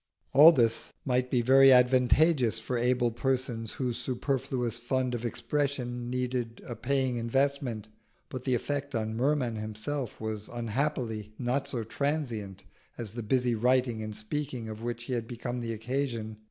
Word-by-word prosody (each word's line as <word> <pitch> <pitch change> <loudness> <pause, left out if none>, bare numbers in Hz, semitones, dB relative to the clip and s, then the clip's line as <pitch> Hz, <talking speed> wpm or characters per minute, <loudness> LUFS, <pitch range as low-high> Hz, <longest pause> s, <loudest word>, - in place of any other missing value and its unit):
All 150 +5 +10
this 115 -6 +1
might 125 -1 +1
be 125 -2 +2
very 135 +2 +7
advantageous 125 +1 +4
for 115 +3 -3
able 120 0 +2
persons 120 -2 -2
whose 125 -3 -2
superfluous 125 -2 -1
fund 125 +1 -1
of 120 -1 -3
expression 125 -1 -2
needed 125 -2 -2
a 120 - -5
paying 130 +1 0
investment, 120 -2 0 0.4
but 130 -1 -6
the 130 -2 +1
effect 140 +2 -3
on 110 0 -2
Merman 125 -2 +1
himself 110 +5 -4
was 110 -1 -4
unhappily 115 -3 -2
not 130 +2 -1
so 120 -5 -2
transient 115 -6 -3 0.3
as 110 -4 -5
the 120 - -4
busy 125 +2 +1
writing 125 0 +2
and 110 -1 -5
speaking 125 +1 -4
of 110 0 -7
which 120 0 -4
he 125 - -4
had 115 -2 -2
become 120 +1 -4
the 115 -1 -3
occasion. 115 -1 -3
125 Hz, 155 wpm, -29 LUFS, 115-130 Hz, 0.4 s, All